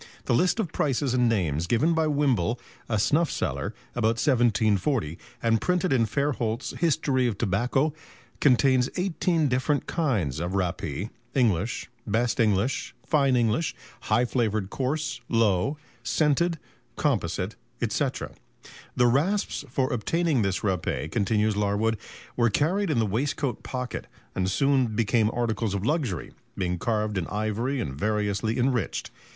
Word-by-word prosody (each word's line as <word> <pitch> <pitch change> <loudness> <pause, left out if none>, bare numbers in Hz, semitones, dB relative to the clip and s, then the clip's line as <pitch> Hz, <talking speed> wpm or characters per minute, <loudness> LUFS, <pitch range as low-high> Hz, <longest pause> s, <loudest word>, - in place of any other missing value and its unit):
The - - +1
list 180 - +2
of 185 -8 -1
prices 135 -2 0
and 125 -2 +3
names 85 -7 0
given 120 - +2
by 160 -1 +2
Wimble, 130 - +1 0.3
a 110 - +1
snuff 155 - +2
seller, - - -2 0.2
about 115 +1 +1
1740, 115 - +2 0.3
and 115 -1 +2
printed 180 -3 +1
in 115 -4 +3
Fairholt's 125 -2 -1
"History 140 -6 +1
of 110 -5 -2
Tobacco," 120 +9 +1 0.5
contains 130 -1 +4
eighteen 175 -3 +1
different 130 +3 0
kinds 110 - 0
of 90 +3 -2
rappee 90 - -2 0.2
English, 115 -4 +1 0.2
best 115 +3 0
English, 110 +3 +1
fine 140 -4 +3
English, 120 +6 +1 0.2
high 120 0 +2
flavoured 110 -5 -1
coarse, 135 -2 -2
low, 115 +3 +2 0.2
scented, 155 +6 +1 0.4
composite, - - -1 0.3
&c. - - 0 0.9
The 125 - +4
rasps 145 - +1
for 130 +1 0
obtaining 155 +3 +1
this 95 -4 0
râpé, 90 -5 -1
continues 105 0 +1
Larwood, 105 +2 +1 0.4
"were 120 -1 +3
carried 175 - +1
in 150 - +1
the 115 - +3
waistcoat 125 +4 -1
pocket, 125 -2 -5 0.3
and 95 0 0
soon 130 0 +2
became 110 0 +2
articles 115 -3 -1
of 100 +1 -2
luxury, 135 - -1 0.3
being 90 -2 -1
carved 105 -1 0
in 85 - -3
ivory 110 +6 -1
and 70 - -3
variously 105 - -1
enriched. 125 -5 0
120 Hz, 135 wpm, -26 LUFS, 105-140 Hz, 0.9 s, contains